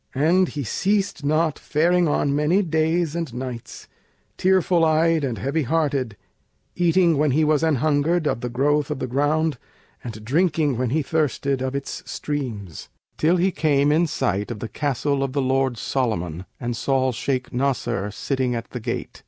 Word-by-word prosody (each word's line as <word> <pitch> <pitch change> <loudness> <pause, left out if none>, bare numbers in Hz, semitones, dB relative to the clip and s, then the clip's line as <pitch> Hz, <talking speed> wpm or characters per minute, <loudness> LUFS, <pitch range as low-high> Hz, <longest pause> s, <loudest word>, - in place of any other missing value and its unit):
And 170 +7 +3
he 145 -3 -4
ceased 195 - -1
not 155 +1 +1
faring 175 +3 +2
on 145 -1 +1
many 160 +7 +2
days 160 0 0
and 165 -5 -3
nights, 125 -2 -7 0.5
tearful 185 -2 +3
eyed 160 0 +3
and 125 -5 -2
heavy 140 +4 -1
hearted; 140 -6 -1 0.6
eating, 175 -3 +3
when 150 0 +3
he 150 +4 +2
was 150 -1 +2
anhungered, 155 +2 +1
of 120 - 0
the 125 - -3
growth 145 +4 +1
of - - -2
the 130 - -3
ground 145 +2 0 0.4
and 110 -2 -8
drinking, 155 0 +1
when 125 -2 0
he 150 +5 0
thirsted, 140 -3 0
of 130 +1 -2
its 140 - -4
streams, 115 - -5 0.3
till 170 +4 +3
he 185 +2 +2
came 150 -3 +2
in 165 +3 +3
sight 105 - -1
of 120 - -4
the 115 - -5
Castle 140 -1 -1
of 135 -1 -2
the 140 - 0
lord 130 -2 +1
Solomon 95 - -2
and 120 -1 -3
saw 130 +1 +1
Shaykh 130 +1 -3
Nasr 125 -6 -1
sitting 130 +3 -2
at 115 - -6
the 125 - -5
gate. 110 - -5
145 Hz, 170 wpm, -23 LUFS, 130-160 Hz, 0.6 s, And